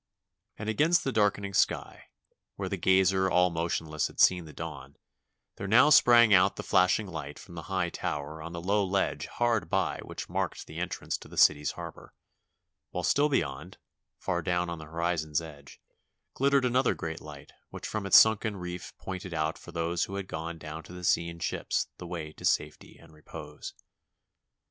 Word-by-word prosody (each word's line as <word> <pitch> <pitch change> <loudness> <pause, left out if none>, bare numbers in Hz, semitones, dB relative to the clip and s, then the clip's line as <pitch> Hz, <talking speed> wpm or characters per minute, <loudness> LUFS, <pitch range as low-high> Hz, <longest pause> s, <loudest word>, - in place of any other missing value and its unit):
And 105 - -6
against 155 +10 +3
the 135 - -1
darkening 100 -3 +1
sky, - - 0 0.5
where 95 -2 -4
the 100 - -1
gazer 95 +1 +3
all 90 0 +3
motionless 80 -2 -1
had - - -14
seen 90 -2 +5
the 75 - -10
dawn, 70 -4 -8 0.6
there 100 - -5
now 115 +8 +6
sprang 120 -6 +7
out 95 +1 +5
the - - -6
flashing 95 +4 +3
light 80 -6 -7
from 95 - -13
the 85 - -6
high 95 -3 0
tower 75 +2 -4
on 85 +2 -7
the 85 -1 -6
low 100 +2 +2
ledge 95 0 -1
hard 115 -8 0
by - - 0
which - - -7
marked - - -3
the - - -8
entrance - - -3
to - - -12
the - - -12
city's 75 -1 +4
harbor; - - -10 0.7
while - - -4
still 145 +1 +3
beyond, 70 - -2 0.4
far 85 -1 -2
down 90 -1 -1
on 85 - -5
the 80 - -9
horizon's 80 -2 -1
edge, 75 -4 -11 0.6
ghttered 140 -1 +3
another 125 +1 +2
great 80 0 -5
light 75 -2 -11 0.2
which - - -7
from 105 -2 -3
its - - +8
sunken 110 -1 +4
reef 90 -1 -7
pointed 95 -2 -6
out 80 0 0
for - - -12
those 85 +1 -1
who 100 - -7
had 100 -1 -4
gone 80 0 -5
down 80 0 -7
to 85 - -13
the 90 0 -9
sea 85 -1 +2
in 85 - -9
ships 85 - -2
the 90 - -7
way 80 -3 -6
to - - -14
safety - - -1
and 85 -1 -18
repose. 75 -1 -10
90 Hz, 185 wpm, -29 LUFS, 80-100 Hz, 0.7 s, its